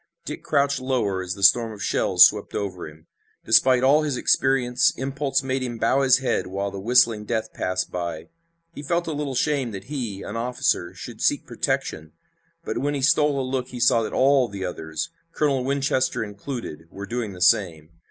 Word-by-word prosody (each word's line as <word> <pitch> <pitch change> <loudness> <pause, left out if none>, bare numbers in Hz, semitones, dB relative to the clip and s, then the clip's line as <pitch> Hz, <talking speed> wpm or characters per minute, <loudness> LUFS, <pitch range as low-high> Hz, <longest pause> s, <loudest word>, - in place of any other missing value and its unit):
Dick - - -6
crouched 140 -1 +1
lower 120 -8 -1
as 90 0 -4
the 100 - -8
storm 115 +3 +5
of 105 -3 -8
shells - - +5
swept - - -1
over 95 -4 -4
him. 80 +1 -15 0.4
Despite 125 +3 +4
all 145 +4 +5
his 145 -4 -2
experience 125 -1 +2
impulse 135 +1 -1
made 130 0 -2
him 120 -2 -4
bow 135 +4 +2
his 130 -1 +5
head 130 -6 -1
while 100 +1 -3
the 100 - -7
whistling 115 0 +3
death 110 0 -3
passed 95 0 -2
by. 85 -3 -5 0.4
He - - -8
felt 170 +3 -1
a 160 - -3
little 145 -2 -3
shame 140 -1 0
that 95 -1 -7
he, 110 -8 -4
an 105 - -7
officer, 125 +2 -1
should - - -9
seek - - +1
protection, 80 0 -3 0.5
but - - -3
when 145 +1 -1
he 135 - -3
stole 145 0 +3
a 130 - -2
look 130 -1 -2
he 125 -1 -8
saw 115 -1 +4
that 110 - -4
all 135 -1 +3
the 100 -3 -6
others, 80 -3 -5 0.2
Colonel 140 -4 0
Winchester 135 -2 0
included, 105 - -7
were 100 +3 -8
doing 120 -3 -4
the 90 - -11
same. 90 -6 +2
125 Hz, 190 wpm, -23 LUFS, 100-135 Hz, 0.5 s, storm